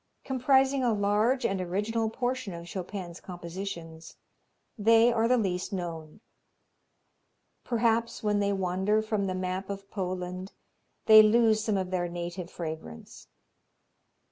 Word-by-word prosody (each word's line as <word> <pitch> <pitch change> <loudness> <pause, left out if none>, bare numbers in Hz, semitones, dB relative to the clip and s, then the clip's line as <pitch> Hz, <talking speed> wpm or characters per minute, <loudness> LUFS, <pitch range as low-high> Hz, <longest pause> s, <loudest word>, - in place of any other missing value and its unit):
Comprising 265 +1 +2
a 240 -2 +2
large 215 +5 +1
and 195 -1 0
original 210 +5 -1
portion 245 -4 -3
of 170 0 -8
Chopin's 185 -1 -6
compositions, 170 -2 -8 0.6
they 230 +2 +5
are 230 0 +2
the 250 +1 +4
least 185 -5 -1
known. 170 -1 -6 1.4
Perhaps 230 -1 0
when 210 -1 +1
they 200 0 +1
wander 190 +3 0
from 215 -2 -1
the 185 - -2
map 185 +1 -3
of 195 0 -7
Poland 185 0 -4 0.5
they 215 -1 +10
lose 215 0 +4
some 215 -3 0
of 185 -1 -3
their 180 -1 0
native 175 +1 -5
fragrance. 155 - -8
200 Hz, 125 wpm, -28 LUFS, 180-225 Hz, 1.4 s, they